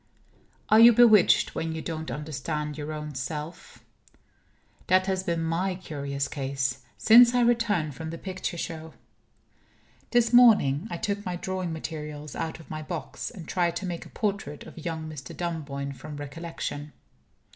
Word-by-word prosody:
Are 215 - +7
you 235 +1 +9
bewitched 220 -4 +6
when 160 0 -3
you 160 - -4
don't 160 -1 -4
understand 150 0 -4
your 150 +1 -5
own 150 -1 -5
self? 150 +6 -6 1.0
That 185 0 +4
has 190 -1 0
been 170 -3 -1
my 175 +3 0
curious 140 -5 -4
case, 135 -3 -2 0.2
since 240 +2 +7
I 245 - +4
returned 230 -10 +2
from 160 +3 -6
the 165 - -6
picture 185 -1 -4
show. 160 -1 -6 1.1
This 240 -1 +2
morning 210 - +6
I 170 - -4
took 205 +1 -2
my 180 -3 -3
drawing 185 -1 -3
materials 150 -2 -6
out 160 0 -4
of 160 - -14
my 155 0 -5
box, 165 +2 -5
and 170 -4 -10
tried 175 -2 0
to 190 - -3
make 175 -2 -5
a - - -16
portrait 195 -9 -3
of 160 - -11
young 160 -2 -4
Mr. 145 -4 -8
Dunboyne 145 -5 -4
from 145 +3 -9
recollection. 145 0 -6
165 Hz, 155 wpm, -27 LUFS, 150-185 Hz, 1.1 s, you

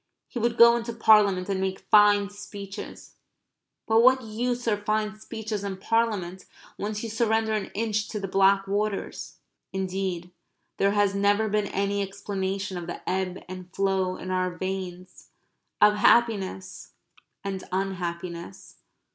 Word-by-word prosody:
He 245 - -5
would 235 +1 0
go 235 0 +8
into 235 0 -4
Parliament 210 -5 +4
and 195 -1 -1
make 190 0 -2
fine 205 -1 +6
speeches 200 -1 -9 0.7
but 225 0 +4
what 260 +1 +5
use 240 +2 -3
are 215 - +3
fine 215 0 -1
speeches 215 -2 -5
and 195 -2 -4
Parliament, 200 -5 -1 0.3
once 210 +1 -4
you 230 - -4
surrender 220 -1 +1
an 215 -2 -2
inch 215 -1 -1
to 210 - -4
the 195 - -4
black 195 +1 +3
waters? 205 +1 -3 0.3
Indeed 185 -2 -3 0.5
there 200 +1 +2
has 205 -1 +2
never 205 +2 +2
been 210 -1 0
any 200 +1 -1
explanation 195 -1 -3
of 175 -1 -6
the 175 - -8
ebb 185 -1 -2
and 185 0 -9
flow 190 -2 0
in 185 - -6
our 185 0 +1
veins 185 0 -6 0.5
of 210 0 +5
happiness 210 -4 +1 0.5
and 195 -1 -4
unhappiness. 175 - -4
200 Hz, 140 wpm, -26 LUFS, 190-215 Hz, 0.7 s, go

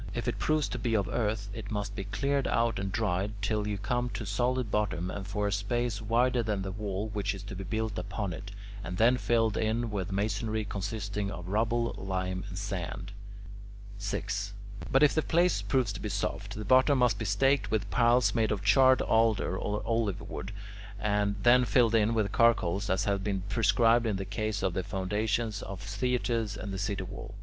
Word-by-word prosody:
If - - -3
it - - -1
proves 155 -1 +1
to 125 - -4
be 115 0 0
of 100 -3 +1
earth, 105 -2 -1
it 105 -2 -7
must 105 -1 -3
be 100 - -4
cleared 140 +6 0
out 115 0 +1
and 95 0 -3
dried 100 -1 0
till 105 +1 -1
you 105 -1 -2
come 120 +5 -1
to 110 - -4
solid 120 +3 0
bottom 95 -4 -1
and 100 -1 -6
for 105 +1 -1
a 100 - 0
space 105 +2 -1
wider 120 +3 +2
than 105 -3 -1
the 95 - -4
wall 105 +1 -3
which 100 -2 -2
is 95 - -8
to 100 -2 -7
be 95 - -5
built 110 +1 -2
upon 100 0 -3
it, 100 +3 -8 0.3
and 90 +2 -5
then 115 +4 +5
filled 115 -3 +1
in 110 +1 0
with 100 -2 -3
masonry 110 +2 -1
consisting 100 0 -3
of 90 -2 -7
rubble, 115 +3 +1
lime, 95 -1 -2
and 95 - -7
sand. 95 0 -4 0.9
6. 100 0 -3 0.4
But 135 +2 +5
if 145 - +5
the 155 - +2
place 175 +3 +2
proves 125 -6 +1
to - - -6
be 105 - -3
soft, 100 0 -3
the 105 +1 -5
bottom 130 +5 +5
must 120 -5 +2
be 115 - -3
staked 135 +8 +2
with 110 -2 0
piles 120 +1 +4
made 110 -2 +1
of 100 -2 -2
charred 130 +4 +5
alder 110 -4 +2
or 105 +2 -2
olive 115 -4 -1
wood, 95 - -6 0.5
and 105 0 +1
then 125 +1 +6
filled 115 +1 +3
in 115 0 +3
with 105 -3 0
charcoal 115 -7 +4
as 95 +2 +1
has 100 -1 +1
been 95 -1 -2
prescribed 115 +3 +3
in 105 - 0
the 95 0 -3
case 105 +1 -2
of 95 - +1
the 95 - -1
foundations 105 +3 -1
of 95 -1 -6
theatres 115 +1 -1
and 100 -2 -5
the 95 - -3
city 100 -1 -2
wall. 100 +3 -8
105 Hz, 200 wpm, -30 LUFS, 100-115 Hz, 0.9 s, then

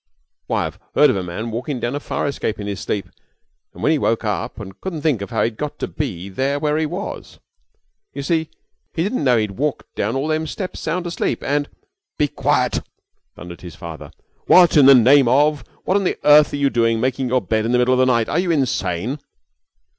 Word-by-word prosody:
Why, - - 0
I've - - -7 0.2
heard - - +6
of - - -2
a 95 - -1
man 90 +6 -5
walkin' 125 +4 -3
down 120 +2 -2
a 145 - -2
fire - - -3
escape 135 -6 -2
in 100 - -5
his 100 -1 -4
sleep, 100 - -3 0.7
and - - -11
then 155 - +3
he 155 - +2
woke 115 - 0
up 105 +1 -3
and 95 -3 -10
couldn't 170 -6 -5
think 145 -10 +1
how 115 - 0
he'd 115 -2 -2
got 150 -1 -4
to - - -3
be 90 +3 -4
there 135 +8 -1
where 150 +1 0
he 160 - 0
was. - - -6 0.7
You 140 - -6
see, 160 +1 0 0.5
he 165 - 0
didn't 205 -1 -1
know 125 -3 +4
he'd 105 -2 0
walked 150 0 -2
down 110 +5 -2
all 140 +4 -1
them 155 0 0
steps 185 +4 -5
sound 180 +1 -2
asleep, 170 -2 -2
and 145 +1 -1 0.2
" 400 +1 -63
"Be 150 - +2
quiet," - - 0 0.6
thundered 85 0 -10
his 85 -4 -10
father. 80 0 -9 0.4
"What 180 -2 +6
in 145 -3 +7
the 135 - +9
name 130 +2 +6
of 145 +2 +3 0.2
what 190 - +2
on 195 -3 +1
earth 150 0 +6
are - - -3
you 140 -1 +1
doing 115 -1 +2
making 130 +2 -1
your 130 +1 +3
bed 110 +3 0
in 115 - -1
the 125 - +3
middle 125 +1 +3
of 130 - +2
the 130 - +5
night? 115 -3 +2
Are 160 - 0
you 180 0 -1
insane?" 125 - -1
135 Hz, 220 wpm, -20 LUFS, 110-150 Hz, 0.7 s, the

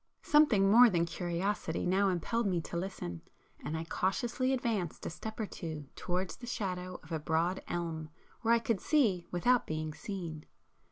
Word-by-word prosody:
Something 235 -11 +5
more 240 +2 +9
than 170 -4 +2
curiosity 175 +1 -2
now 195 +2 +3
impelled 205 +6 0
me 180 -3 +1
to 165 - -7
listen, 170 - -4 0.4
and 160 - -2
I 160 - -3
cautiously 235 +9 0
advanced 225 -10 -1
a - - -3
step 220 +7 -7
or 220 - 0
two 155 -7 -6
towards 180 +1 -2
the 240 - -9
shadow 185 -5 -3
of - - -15
a 160 - -1
broad 165 +4 0
elm 165 -3 -3 0.3
where 230 +1 +4
I - - +5
could 230 -4 -1
see 205 - +2
without 240 +8 +2
being 155 0 -3
seen. 170 -6 -6
185 Hz, 170 wpm, -32 LUFS, 165-220 Hz, 0.4 s, more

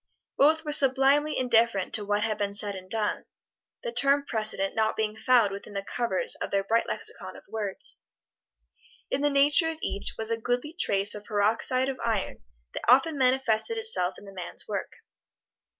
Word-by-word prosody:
Both 315 +3 +3
were 300 - -3
sublimely 280 +2 +4
indifferent 230 -6 +1
to 215 - +1
what 205 +1 0
had 220 -2 -2
been 200 -1 -2
said 205 -1 +2
and 185 -1 -10
done 215 0 -1 0.6
the 235 - -3
term 275 +4 +2
precedent 215 -5 -2
not 220 0 0
being 215 -1 -2
found 235 -3 +3
within 200 +1 -9
the 200 -1 -4
covers 235 -4 -1
of - - -3
their 195 0 0
bright 225 +4 0
lexicon - - -5
of - - -13
words. 210 -3 -4 1.1
In 275 - -1
the 290 - +2
nature 290 +3 +3
of 325 - -5
each 200 - -3
was 225 0 -1
a 230 - 0
goodly 245 +6 -2
trace 200 - +1
of 210 0 -9
peroxide 230 +5 +1
of 270 -1 -4
iron 220 - -2 0.3
that - - -5
often 270 +5 +4
manifested 260 - +1
itself 435 - +2
in - - -13
the 195 - -12
man's 180 -2 -7
work. - - -4
225 Hz, 180 wpm, -27 LUFS, 205-270 Hz, 1.1 s, sublimely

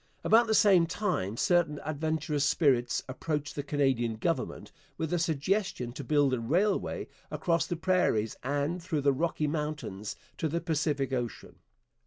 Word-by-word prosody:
About 230 +1 +5
the 220 - +2
same 195 -5 +5
time 170 - -2
certain 170 -3 +2
adventurous 155 -1 -1
spirits 135 -5 +2
approached 145 +2 -3
the 145 - -2
Canadian 135 -5 0
Government 110 - -2 0.3
with 160 +1 -2
a 175 - +2
suggestion 165 - -1
to 140 - -6
build 145 0 +2
a 125 - 0
railway 180 - 0 0.2
across 170 -3 0
the 175 - -2
prairies 160 - +1
and 145 +6 -1
through 165 -4 -2
the 140 0 +3
Rocky 155 +2 -1
mountains 150 -9 -3 0.2
to 160 - +1
the 165 +3 -1
Pacific 150 -5 -1
ocean. 120 -3 -4
150 Hz, 150 wpm, -29 LUFS, 135-170 Hz, 0.3 s, About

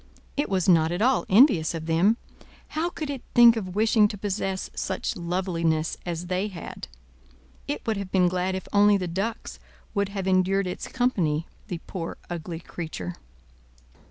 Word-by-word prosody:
It 290 -4 -1
was 190 -2 0
not 165 -3 +5
at 175 +5 0
all 260 +1 +2
envious 190 - +5
of 160 -1 -5
them. 175 +8 +3 0.5
How 320 +3 -1
could 310 -4 -5
it 270 -3 -5
think 235 -1 +8
of 190 -5 -4
wishing 215 0 +4
to 205 - -7
possess 195 -1 -3
such - - -2
loveliness 170 -2 -1
as 170 0 -3
they 185 +3 -1
had? 180 -5 -8 0.8
It 145 - -3
would 220 -2 0
have 195 -2 -5
been 185 -2 +4
glad 185 +1 0
if 190 - -5
only 205 0 +6
the 185 -2 -3
ducks 195 +7 -4 0.3
would 200 -2 0
have 195 -2 -4
endured 190 +1 +2
its 180 - -5
company 175 -12 0 0.2
the 175 -5 -5
poor, 170 -3 -5
ugly 165 -1 -5
creature! 155 - -6
190 Hz, 165 wpm, -26 LUFS, 170-210 Hz, 0.8 s, think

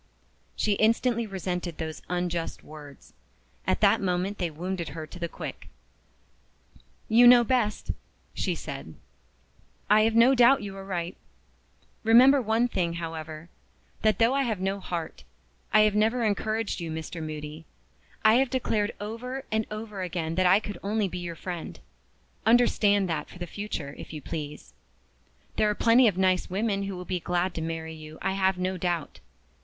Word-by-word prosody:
She 215 - 0
instantly 230 +2 +2
resented 180 -3 -4
those 160 -1 -5
unjust 175 -2 -2
words. 145 -2 -13 0.5
At - - +1
that - - +4
moment 185 +2 -1
they 175 -2 0
wounded 170 +1 -4
her 155 - -4
to 165 +3 -12
the 170 -1 -3
quick. - - -8 1.4
"You 240 +2 +7
know 245 0 +8
best," 235 -4 0 0.4
she - - -1
said. - - -7 1.0
"I 215 +1 +7
have 225 +1 +2
no 235 +3 +6
doubt 250 0 +5
you 195 -1 -6
are 195 - -8
right. 180 -2 -4 0.9
Remember 255 +5 +7
one 225 +1 +2
thing, 175 -7 -1
however, 160 -1 -6 0.5
that 215 -3 +3
though 230 +3 +4
I 275 - +2
have 225 -7 -1
no 195 +1 -1
heart, 170 -4 -5 0.5
I 215 - +6
have 215 -1 +4
never 220 +3 +2
encouraged 215 0 -1
you, 170 -2 -4
Mr. 160 +1 -5
Moody. 155 0 -6 0.6
I 220 +2 +7
have 265 0 +2
declared 225 -5 -1
over 245 +6 -5
and 220 0 0
over 210 -2 -6
again 170 -3 -3
that 185 +1 +3
I 190 +3 +6
could 205 -4 -7
only 210 0 0
be 180 - -5
your 175 -1 -5
friend. 175 0 -6 0.6
Understand 215 -4 +4
that 155 -3 -3
for - - -12
the 175 - -5
future, 175 -7 -5
if - - -9
you 155 - -5
please. 150 - -7 0.8
There 215 - +3
are 210 - 0
plenty 235 +3 +5
of 195 -4 +1
nice 185 -1 +2
women 200 +1 0
who 195 -1 -4
will 180 - -7
be 180 -1 -2
glad 175 +2 -1
to 165 - -4
marry 160 0 -4
you, 155 0 -10
I 195 - -1
have 190 -1 +1
no 185 +1 -1
doubt. 170 - -2
190 Hz, 170 wpm, -27 LUFS, 170-220 Hz, 1.4 s, know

